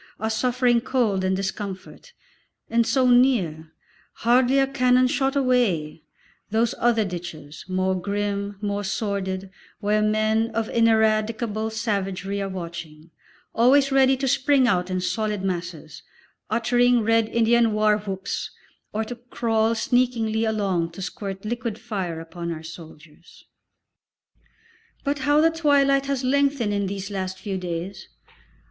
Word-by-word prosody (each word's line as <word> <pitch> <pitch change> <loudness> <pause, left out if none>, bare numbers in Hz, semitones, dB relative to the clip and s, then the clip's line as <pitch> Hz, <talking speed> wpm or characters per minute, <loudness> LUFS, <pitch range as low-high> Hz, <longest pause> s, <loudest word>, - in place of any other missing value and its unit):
are 220 +1 -1
suffering 245 +1 +2
cold 230 -7 0
and 190 0 +1
discomfort, 195 - -6 0.6
and 230 0 +2
so 255 +3 +3
near, 210 - +2 0.5
hardly 250 +3 +4
a 270 - +4
cannon 255 -1 +3
shot 270 +2 0
away, 230 - +1 0.5
those 225 +2 +1
other 230 -2 +2
ditches, 170 -5 -7
more 185 0 0
grim, 200 +1 -3
more 205 -1 -2
sordid, 195 -2 -3 0.3
where 210 0 +1
men 215 +1 +1
of 225 -1 0
ineradicable 220 -1 +1
savagery 200 -3 -2
are 195 - -3
watching, 170 -3 -8 0.4
always 270 +4 +4
ready 270 0 +4
to 270 +1 -2
spring 265 0 +3
out 180 -4 +1
in 185 0 -1
solid 210 +1 -2
masses, 175 -5 -5 0.5
uttering 240 +2 +3
Red 225 0 +2
Indian 235 0 +3
war 215 0 +2
whoops, 195 -2 -4 0.4
or 220 +1 -1
to 220 - -6
crawl 230 -2 0
sneakingly 230 -2 +1
along 195 -6 -1
to 190 - -7
squirt 195 +1 -6
liquid 230 -1 -3
fire 195 -8 -4
upon 170 +1 -6
our 160 -1 -6
soldiers. 160 0 -13 1.6
But 285 0 -1
how 290 +3 +3
the 325 +1 +4
twilight 280 -4 +2
has 275 -2 -1
lengthened 275 -4 +1
in 200 -1 -1
these 195 +1 -5
last 190 -1 -4
few 190 -1 -4
days! 180 +2 -5
215 Hz, 130 wpm, -24 LUFS, 190-245 Hz, 1.6 s, hardly